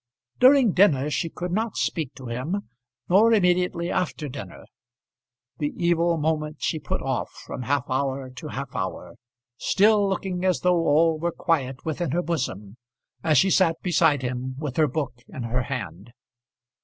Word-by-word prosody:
During 255 -3 +6
dinner 150 -7 +3
she 165 - -1
could 175 +2 -5
not 220 +3 -1
speak 150 -5 -2
to 130 - -10
him, 130 +12 -3 0.4
nor 210 +6 +5
immediately 180 -3 +2
after 155 -4 -2
dinner. 125 -9 -9 0.9
The 145 -1 -1
evil 170 -1 +2
moment 155 0 -1
she 160 - -1
put 145 - -3
off 130 -2 -2 0.2
from - - -6
half 140 +4 0
hour 135 0 -2
to 155 +5 -9
half 140 -2 -6
hour, 95 -1 -4 0.5
still 205 0 +3
looking 190 -2 -2
as 185 -1 +1
though 175 -2 +2
all 160 +2 +3
were 170 +2 -1
quiet 135 -7 -1
within 160 +1 -2
her 175 +1 +1
bosom 120 - -3 0.5
as 155 -3 +3
she 190 +8 +4
sat 170 -4 +3
beside 150 -6 +3
him 125 +1 -3
with 145 -3 -4
her 155 -1 +4
book 135 -4 -4
in 130 - -7
her 120 +2 -1
hand. 120 -5 -6
155 Hz, 160 wpm, -25 LUFS, 130-180 Hz, 0.9 s, During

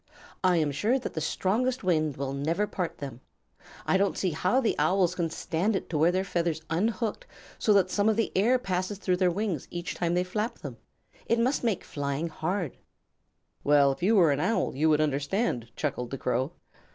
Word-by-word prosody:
"I 180 -2 +4
am 155 -3 +1
sure 215 - +1
that 260 - -5
the 160 - -3
strongest 230 +10 0
wind 155 -5 +1
will 135 0 -3
never 160 +9 0
part 185 -4 -4
them. 135 -3 -7 0.6
I 190 - +3
don't 200 +1 +1
see 185 - 0
how 185 +10 +1
the 235 - +1
Owls 185 -2 +3
can 170 -2 -1
stand 175 +6 -1
it - - -4
to 155 - 0
wear 165 +3 +5
their 185 +1 0
feathers 170 -4 -1
unhooked 220 +6 -1 0.3
so 215 - +2
that 190 -2 +3
some 205 +1 +2
of 220 - +2
the 225 0 0
air 230 +7 +4
passes 190 -3 -2
through 185 -2 0
their 180 -1 +3
wings 185 -5 -2
each 175 0 -4
time 170 0 -1
they 180 - +2
flap 210 +5 -3
them. - - -8 0.5
It 230 - +2
must 250 +4 +1
make 225 -6 0
flying 145 +3 -3
hard." 170 0 -3 0.9
"Well, 145 -1 +5
if 135 - -6
you 210 +6 +3
were 170 -7 +5
an 140 - 0
Owl 205 - 0
you 155 +4 +2
would 155 0 +4
understand," 145 - -1
chuckled 125 -5 -2
the 135 - -4
Crow. 130 +5 -1
180 Hz, 200 wpm, -28 LUFS, 150-205 Hz, 0.9 s, wear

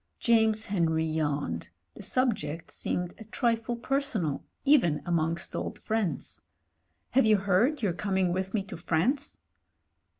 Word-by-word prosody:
James 220 -2 +3
Henry 165 -5 +1
yawned 145 - -2
— 85 -1 -49
the - - -9
subject 190 - -1
seemed 180 0 -2
a - - -8
trifle 230 +1 0
personal 235 - 0 0.2
even 240 - +4
amongst 170 0 0
old - - -3
friends. 215 - -2 0.7
*'Have 255 -2 +4
you 215 -1 +6
heard 205 +9 +2
you're 190 -4 +2
coming 190 -1 0
with 190 +3 -2
me 200 - 0
to 195 - -8
France?" 190 - 0
190 Hz, 135 wpm, -29 LUFS, 165-230 Hz, 0.7 s, you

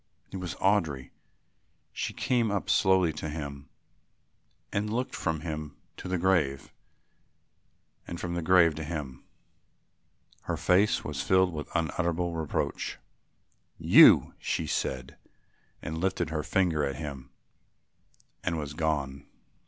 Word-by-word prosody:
It 95 - -5
was 90 -2 -5
Audry. 80 -10 0 0.8
She - - -3
came 120 -4 0
slowly 95 -3 +3
up - - -14
to 80 - -4
him 70 -2 -7 1.0
and 105 +1 -1
looked 125 +3 -2
from 80 -3 -2
him 75 -3 -6 0.2
to - - -7
the 90 0 -1
grave 85 -7 0 1.3
and 85 - -6
from 85 -1 -4
the 85 - -2
grave 85 -1 +5
to 80 - -4
him. 75 -5 -6 1.2
Her - - -2
face 95 +4 +3
was 75 -2 -4
filled 95 +3 +3
with 75 -2 -6
unutterable 85 +1 -1
reproach. 80 -3 -2 0.8
"You," - - +7
she - - -2
said, 65 -1 -3 0.7
and 80 +1 -4
lifted 95 -4 -1
her 80 -1 -1
finger 85 -3 +1
at 70 -2 -1
him 70 -3 -7 1.1
and 85 -2 -1
was 75 -2 -5
gone. 75 -4 -2
80 Hz, 125 wpm, -28 LUFS, 75-90 Hz, 1.3 s, You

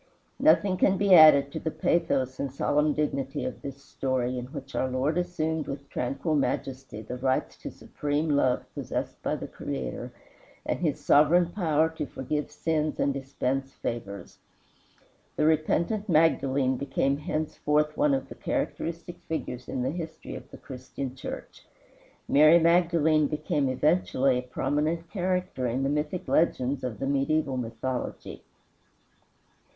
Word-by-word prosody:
Nothing 205 -11 +4
can 190 +1 +3
be 200 -1 +4
added 150 -4 +8
to - - -4
the 160 - -2
pathos 155 -5 0
and 140 -2 -2
solemn 150 +2 +1
dignity 140 -3 -2
of 130 - -5
this 140 0 -8
story, 130 -2 -2
in 125 - -6
which 140 -1 -9
our 130 - 0
Lord 130 +5 0
assumed 160 -3 -1
with 140 0 -6
tranquil 135 +6 -2
majesty 135 -5 -2
the 125 +4 -6
rights 130 0 0
to - - -7
supreme 145 +2 -3
love 130 -3 +2
possessed - - -4
by - - -1
the - - -6
Creator, - - -5 0.5
and - - -1
his - - -2
sovereign 165 +4 +5
power 160 -5 +2
to 160 -2 -5
forgive 145 +4 -3
sins 155 -2 -1
and 140 - +2
dispense 135 0 -3
favors. 100 -4 -6 1.0
The 150 - +1
repentant 170 +7 +1
Magdalene 140 -5 +3
became 140 0 0
henceforth 150 0 -1
one 290 -1 +3
of 270 - -4
the - - -9
characteristic 170 +1 -4
figures 130 -6 -4
in 125 - -2
the 130 - 0
history 165 -1 -7
of - - -9
the - - -11
Christian 130 0 -7
Church. - - -8 0.6
Mary 155 +4 +7
Magdalene 165 -3 +3
became 150 -2 -1
eventually 135 -2 +2
a 125 - -8
prominent 155 +6 -1
character 180 -8 -1
in 125 +3 -1
the 135 - +1
mythic 150 +4 -2
legends 135 -4 +1
of 125 -5 -3
the 135 - -3
mediæval 140 0 0
mythology. 120 +2 -5
145 Hz, 145 wpm, -27 LUFS, 130-160 Hz, 1.0 s, added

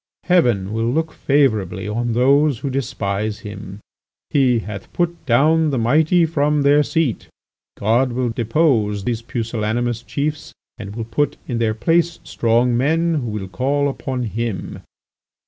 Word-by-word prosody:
Heaven 120 - +2
will 115 +1 0
look 160 +3 -1
favourably 110 -9 +1
on 115 +2 -1
those 140 +3 +3
who 135 +4 -4
despise 105 -5 -2
him. 105 -1 -9 0.5
'He 130 -4 +3
hath 105 -2 -7
put 170 -3 -2
down 155 +6 +3
the 135 - -1
mighty 155 +9 +3
from 150 -2 +1
their 145 +1 +5
seat.' 150 -5 -1 0.5
God 120 +5 +2
will 125 0 0
depose 115 -4 +1
these 115 +1 -2
pusillanimous 115 0 -2
chiefs 145 +4 -4 0.3
and 100 -1 -7
will 115 -1 -4
put 130 +6 -1
in 120 -2 -2
their 110 -2 +1
place 170 +7 +1
strong 120 +1 +1
men 165 +7 +1
who 120 - -4
will 105 -3 -4
call 140 +9 0
upon 130 -2 -3
Him. 115 -3 -4
120 Hz, 145 wpm, -20 LUFS, 110-145 Hz, 0.5 s, their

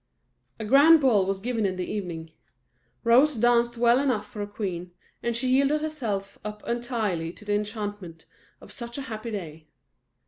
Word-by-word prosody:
A 220 - -4
grand 285 +8 +7
ball 220 -9 +3
was 195 0 -1
given 230 +1 -2
in 190 -2 0
the 180 -1 -4
evening. 170 -6 -5 0.7
Rose 255 +6 +5
danced 240 +1 +3
well 240 +1 +4
enough 250 -7 0
for 210 0 -8
a 205 - -3
queen; 180 -4 -5 0.3
and 235 -1 -1
she 255 +2 -1
yielded 275 +4 +3
herself 230 -11 -4
up 210 0 -7
entirely 225 -9 -2
to 210 - -14
the 205 - 0
enchantment 205 -5 -4 0.4
of - - -13
such 235 0 -7
a 280 - -4
happy 225 -1 -6
day. 160 -7 -7
215 Hz, 170 wpm, -26 LUFS, 195-240 Hz, 0.7 s, grand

